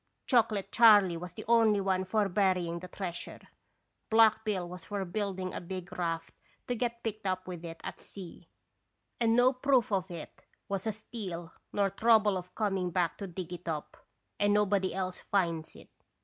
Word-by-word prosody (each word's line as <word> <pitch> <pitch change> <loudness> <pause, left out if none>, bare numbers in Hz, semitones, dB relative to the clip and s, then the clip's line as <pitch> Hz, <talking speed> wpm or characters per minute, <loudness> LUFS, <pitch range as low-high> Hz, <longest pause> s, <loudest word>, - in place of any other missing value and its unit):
Chocolate 215 -6 +2
Charley 205 -6 +7
was 175 +1 -7
the - - -8
only 225 -3 +5
one 190 -1 0
for 205 +2 +1
burying 180 -3 +1
the 180 - -8
treasure; 180 -1 -5 0.7
Black 220 -1 +5
Bill 195 -5 -1
was 180 +1 -9
for 200 -2 -3
building 190 0 -3
a - - -4
big 185 0 -7
raft, 165 -2 -2 0.3
to 245 - 0
get 235 0 -2
picked 215 -2 -3
up 185 0 -2
with 175 -2 -6
it 165 -1 -7
at - - -6
sea, 180 -3 -11 0.7
and 230 -1 +3
no 250 +2 +5
proof 255 -2 +2 0.2
it 170 -3 -9 0.3
was 200 0 -3
a - - +2
steal 195 -6 -7 0.2
nor 200 -1 +1
trouble 215 -1 +4
of 180 0 -6
coming 195 -4 0
back 175 -2 0
to 200 - -4
dig 180 -1 -6
it 175 0 -9
up, 155 -2 -4 0.4
and 205 0 +3
nobody 200 -2 +2
else 185 0 -3
finds 170 -5 -1
it. - - -15
190 Hz, 175 wpm, -31 LUFS, 180-215 Hz, 0.7 s, Charley